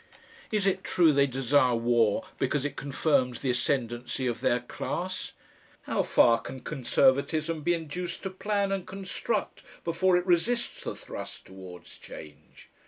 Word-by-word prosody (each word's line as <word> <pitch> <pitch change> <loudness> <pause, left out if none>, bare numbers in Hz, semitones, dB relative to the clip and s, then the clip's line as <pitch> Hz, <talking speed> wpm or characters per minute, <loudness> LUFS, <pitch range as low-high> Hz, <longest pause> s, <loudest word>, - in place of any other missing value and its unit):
Is 210 -2 +1
it 195 - +1
true 165 -4 +4
they 140 0 +4
desire 130 -1 +2
war 115 -2 +2
because 135 +1 0
it 145 - -3
confirms 135 -3 0
the 130 - +1
ascendency 125 0 -1
of 120 -2 -2
their 120 - +2
class? 185 +8 -4 0.5
How - - 0
far 115 -1 +4
can 130 0 -8
Conservatism 150 +4 +1
be 175 +3 +2
induced 170 +2 -5
to 190 - -3
plan 200 +1 -1
and 195 -2 -2
construct 195 +3 -3 0.2
before 180 +2 +2
it 180 - -1
resists 215 +7 0
the - - -3
thrust - - -8
towards 95 -2 -12
change. 75 -1 -12
145 Hz, 145 wpm, -28 LUFS, 125-180 Hz, 0.5 s, true